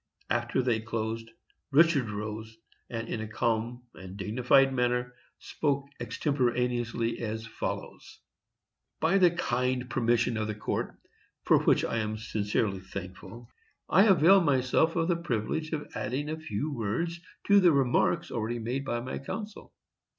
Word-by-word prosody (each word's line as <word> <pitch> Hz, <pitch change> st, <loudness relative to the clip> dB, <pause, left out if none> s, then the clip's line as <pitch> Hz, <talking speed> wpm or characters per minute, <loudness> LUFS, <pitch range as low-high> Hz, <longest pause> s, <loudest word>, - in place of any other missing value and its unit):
After 120 Hz, +2 st, +1 dB
they 120 Hz, -3 st, +1 dB
closed, 115 Hz, 0 st, -4 dB, 0.4 s
Richard 145 Hz, -4 st, +4 dB
rose, 110 Hz, +2 st, -6 dB, 0.3 s
and 115 Hz, -1 st, -4 dB
in 110 Hz, -, -3 dB
a 110 Hz, -, -4 dB
calm 115 Hz, +2 st, -1 dB
and 95 Hz, +1 st, -10 dB
dignified 125 Hz, +6 st, +3 dB
manner 125 Hz, 0 st, 0 dB, 0.2 s
spoke 140 Hz, -2 st, -1 dB
extemporaneously 120 Hz, -4 st, -1 dB
as 110 Hz, -1 st, -4 dB
follows: 115 Hz, -, -6 dB, 0.8 s
"By 170 Hz, +5 st, +3 dB
the 180 Hz, -2 st, +7 dB
kind 125 Hz, -6 st, -1 dB
permission 120 Hz, 0 st, +1 dB
of 110 Hz, 0 st, -1 dB
the 110 Hz, -, -3 dB
Court, 105 Hz, -, -3 dB, 0.5 s
for -, -, +5 dB
which -, -, +3 dB
I -, -, -2 dB
am 110 Hz, 0 st, -2 dB
sincerely 105 Hz, -2 st, -1 dB
thankful, 95 Hz, +5 st, -9 dB, 0.4 s
I 195 Hz, +4 st, +5 dB
avail 190 Hz, 0 st, +6 dB
myself 145 Hz, +2 st, +2 dB
of 165 Hz, -1 st, +1 dB
the 175 Hz, -, +2 dB
privilege 155 Hz, +1 st, -2 dB
of 150 Hz, -2 st, -3 dB
adding 125 Hz, +8 st, -3 dB
a 160 Hz, +1 st, -4 dB
few 145 Hz, +1 st, -3 dB
words 140 Hz, +10 st, -2 dB, 0.3 s
to 200 Hz, 0 st, +6 dB
the 180 Hz, -3 st, +6 dB
remarks 135 Hz, -4 st, +2 dB
already 115 Hz, +1 st, -2 dB
made 120 Hz, +4 st, -3 dB
by 120 Hz, -3 st, -2 dB
my 130 Hz, -, -5 dB
counsel. 210 Hz, +9 st, -7 dB
120 Hz, 145 wpm, -29 LUFS, 110-145 Hz, 0.8 s, the